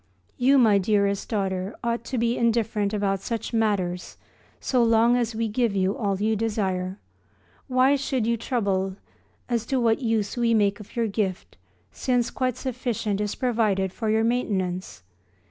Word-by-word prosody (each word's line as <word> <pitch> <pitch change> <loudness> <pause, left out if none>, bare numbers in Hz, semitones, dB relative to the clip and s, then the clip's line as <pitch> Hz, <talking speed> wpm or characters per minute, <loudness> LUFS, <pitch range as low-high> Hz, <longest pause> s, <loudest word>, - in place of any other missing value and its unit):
You, 265 +3 +4
my 220 -6 +5
dearest 200 0 +1
daughter, 195 -2 -2
ought 235 0 -1
to 260 - -3
be 235 +1 +1
indifferent 225 -3 +1
about 200 -2 0
such 230 +4 -4
matters 195 -6 -1 0.4
so 255 -2 +1
long 230 +1 +4
as 240 -2 -1
we 225 0 0
give 220 -1 0
you 190 +1 +1
all 200 -4 -1
you 220 +2 +1
desire. 195 -4 -1 0.7
Why 260 +1 +4
should 265 -4 -1
you 235 +1 +2
trouble 200 -5 -1 0.5
as 235 -3 0
to 265 - +1
what 230 +2 +2
use 225 -4 0
we 235 -2 +2
make 205 0 +2
of 210 - -13
your 235 -1 +1
gift 200 -3 -3 0.4
since 245 - 0
quite 255 -2 -1
sufficient 235 -5 -2
is 210 -1 -2
provided 215 -6 0
for 220 -2 -3
your 220 +1 +2
maintenance? 185 - -1
220 Hz, 160 wpm, -25 LUFS, 200-235 Hz, 0.7 s, my